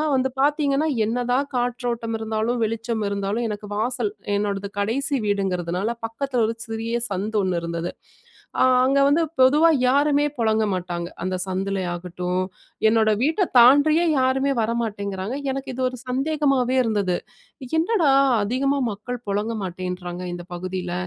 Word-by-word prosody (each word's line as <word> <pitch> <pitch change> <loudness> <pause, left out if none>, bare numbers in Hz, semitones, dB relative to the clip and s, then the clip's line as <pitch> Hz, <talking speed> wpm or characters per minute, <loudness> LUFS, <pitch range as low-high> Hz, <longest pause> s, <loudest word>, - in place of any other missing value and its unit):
வந்து 260 0 +1
பாத்தீங்கன்னா, 290 0 +2 0.2
என்னதான் 245 +4 0
காற்றோட்டம் 235 -2 -2
இருந்தாலும், 220 +2 -1
வெளிச்சம் 225 0 -3
இருந்தாலும் 200 -1 -2 0.2
எனக்கு 210 0 -6
வாசல் 245 - -1 0.3
என்னோடது 200 -1 -1
கடைசி 275 +8 0
வீடுங்கிறதுனால 190 0 -1
பக்கத்துல 250 +1 -2
ஒரு 225 - -1
சிறிய 225 +1 -3
சந்து 205 +3 -2
ஒன்னு 185 -2 0
இருந்துது. 170 +1 -3 0.7
ஆ - - +7 0.2
அங்க 275 +1 +3
வந்து 300 +4 +3 0.2
பொதுவா 295 +6 +6 0.2
யாருமே 285 +2 +3
புழங்க 220 -1 +2
மாட்டாங்க. 175 -1 -3 0.2
அந்த 185 0 -1
சந்துலயாகட்டும், 180 -1 -2 0.5
என்னோட 220 -1 +3
வீட்ட 325 +6 +2
தாண்டியே 290 +7 +6
யாருமே 265 +2 +2
வர 220 +1 0
மாட்டேங்கிறாங்க. 200 +2 -3
எனக்கு 270 0 -4
இது 260 - -2
ஒரு 255 - -8
சந்தேகமாவே 270 -1 +1
இருந்துது. 200 -5 0 0.6
"என்னடா, 335 -5 +2 0.3
அதிகமா 275 +6 0
மக்கள் 240 +4 -6
புழங்க 210 +3 -1
மாட்டேன்றாங்க 180 0 -5
இந்த 175 0 -7
பகுதியில?" 180 0 -4
225 Hz, 130 wpm, -23 LUFS, 195-265 Hz, 0.7 s, ஆ